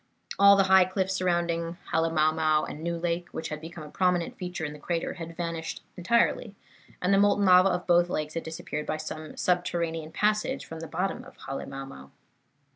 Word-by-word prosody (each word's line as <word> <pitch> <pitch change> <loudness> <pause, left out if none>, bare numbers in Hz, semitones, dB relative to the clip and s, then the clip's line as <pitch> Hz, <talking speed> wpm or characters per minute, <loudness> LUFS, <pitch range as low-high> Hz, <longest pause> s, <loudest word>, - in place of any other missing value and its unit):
All 200 0 +8
the 195 - +4
high 190 -1 +6
cliffs 190 0 -1
surrounding 170 -2 0 0.2
Halemaumau 155 -1 +2
and 150 - -7
New 170 +1 -2
Lake, 170 +1 -2
which - - -5
had 155 0 -5
become 165 0 -8
a 150 - -11
prominent 180 -2 +1
feature 180 -3 -5
in 150 - -5
the 150 - -11
crater, 170 +2 -2
had 165 -2 -8
vanished 165 -2 -4
entirely, 220 +2 +1 0.4
and 180 +2 +1
the 195 - +5
molten 205 0 +3
lava 185 +1 +7
of 180 -1 -2
both 175 0 +4
lakes 155 -2 -2
had 165 - -2
disappeared 160 -2 -5
by 155 - -1
some 155 0 -7
subterranean 170 -3 -1
passage 215 +7 0
from 160 - -8
the 165 - -6
bottom 190 +9 -2
of 260 - -15
Halemaumau. 135 - -7
170 Hz, 185 wpm, -27 LUFS, 160-185 Hz, 0.4 s, All